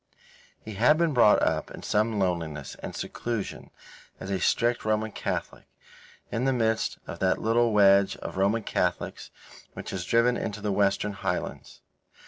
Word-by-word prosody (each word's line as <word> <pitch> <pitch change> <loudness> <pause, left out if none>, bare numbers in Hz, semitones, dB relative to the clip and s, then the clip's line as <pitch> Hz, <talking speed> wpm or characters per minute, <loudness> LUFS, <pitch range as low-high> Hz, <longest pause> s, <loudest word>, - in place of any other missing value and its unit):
He 110 - -9
had 125 +10 +4
been 170 -2 +1
brought 115 -5 +5
up - - 0
in - - -10
some 110 +1 +1
loneliness 85 -7 -2
and - - -6
seclusion 115 -4 -4 0.5
as 95 - -6
a 95 - 0
strict 120 +7 +1
Roman 110 0 0
Catholic, - - -4 0.7
in 120 +3 -1
the 135 - +3
midst 115 -2 0
of 85 - -8
that 95 -1 +2
little 115 +1 +2
wedge 100 -1 +5
of - - -7
Roman 100 +4 +1
Catholics 90 -2 -2 0.4
which - - -7
is 95 -2 -3
driven 115 +5 +2
into 105 0 -4
the 105 0 -2
Western 100 +1 +1
Highlands. 95 -2 -4
105 Hz, 155 wpm, -27 LUFS, 95-115 Hz, 0.7 s, brought